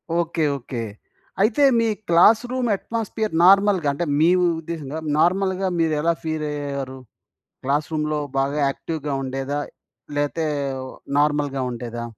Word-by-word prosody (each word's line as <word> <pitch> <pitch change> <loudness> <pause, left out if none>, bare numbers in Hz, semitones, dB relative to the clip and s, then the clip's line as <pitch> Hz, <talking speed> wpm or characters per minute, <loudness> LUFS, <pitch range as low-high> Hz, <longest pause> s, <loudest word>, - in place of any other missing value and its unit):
Okay. 170 -1 0
Okay. 120 -2 -6 0.6
అయితే 225 +7 +3 0.2
మీ 230 - +2 0.2
classroom 235 +8 +4
atmosphere 220 -1 -3
నార్మల్‌గా 195 -3 +5
అంటే 175 +4 -2
మీ 165 +2 +5 0.3
ఉద్దేశ్యంగా, 160 -2 -5 0.2
నార్మల్‌గా 190 +2 +2
మీరెలా 160 +1 +2
ఫీలయ్యారు? 145 -4 -3 0.7
క్లాస్‌రూమ్‌లో 150 +2 0 0.2
బాగా 140 +2 0
యాక్టివ్‌గా 150 0 -4
ఉండేదా. 135 +2 -3 0.6
లేతే 145 +2 0 0.7
నార్మల్‌గా 145 -2 +1
ఉండేదా? 120 -1 -5
155 Hz, 100 wpm, -22 LUFS, 140-185 Hz, 0.7 s, నార్మల్‌గా